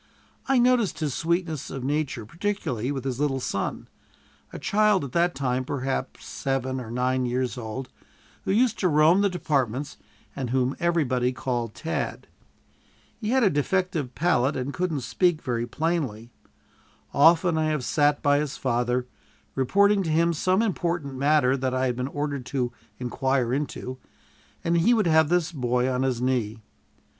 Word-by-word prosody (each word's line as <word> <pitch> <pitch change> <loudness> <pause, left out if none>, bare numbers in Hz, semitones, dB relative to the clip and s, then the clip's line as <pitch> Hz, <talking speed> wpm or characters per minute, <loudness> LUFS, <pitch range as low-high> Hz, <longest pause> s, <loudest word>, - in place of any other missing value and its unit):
I 270 -1 +3
noticed 245 -6 +3
his 155 -4 -2
sweetness 170 -2 -1
of 135 -2 -6
nature 145 -4 -2
particularly 155 - -2
with 135 -3 -4
his 130 -2 -3
little 140 -2 0
son, 100 -5 -3 0.6
a - - -7
child 210 -3 +2
at 135 - -6
that 170 +4 +1
time 130 -1 -1
perhaps 135 0 -3
seven 130 -1 -2
or 115 - -8
nine 125 +1 0
years 125 +1 -1
old, 125 +2 -5 0.6
who - - -1
used 230 +2 +2
to 185 - +2
roam 160 +4 +5
the 200 - +3
departments 140 - -1 0.4
and 130 -3 -3
whom 130 +1 +1
everybody 135 -8 +1
called 120 -3 -3
"Tad." 165 - -3 0.9
He 215 - -3
had 260 +1 +3
a 200 - +4
defective 160 -2 -1
palate, 150 -5 +2
and 130 +2 -3
couldn't 175 -6 -1
speak 170 +7 +1
very 120 -5 -2
plainly. 130 -7 -2 0.8
Often 165 +3 +5
I 155 - +1
have 150 -5 -1
sat 145 +4 +2
by 145 0 +4
his 150 -2 -3
father, 125 0 0 0.5
reporting 200 +10 +3
to 170 - -2
him 170 +2 +3
some 185 +6 +2
important 175 -8 -1
matter 135 -1 +3
that 130 -1 -1
I 130 0 +1
had 125 -1 0
been 125 +1 -2
ordered 145 -2 -3
to 125 -3 -2 0.2
inquire 125 0 0
into, 130 -2 -4 0.6
and 170 0 +2
he 235 +9 +4
would 215 -3 +2
have 160 -2 +4
this 175 -1 +1
boy 125 -4 0
on 130 -1 0
his 130 -2 0
knee. 120 -4 0
140 Hz, 160 wpm, -25 LUFS, 125-170 Hz, 0.9 s, roam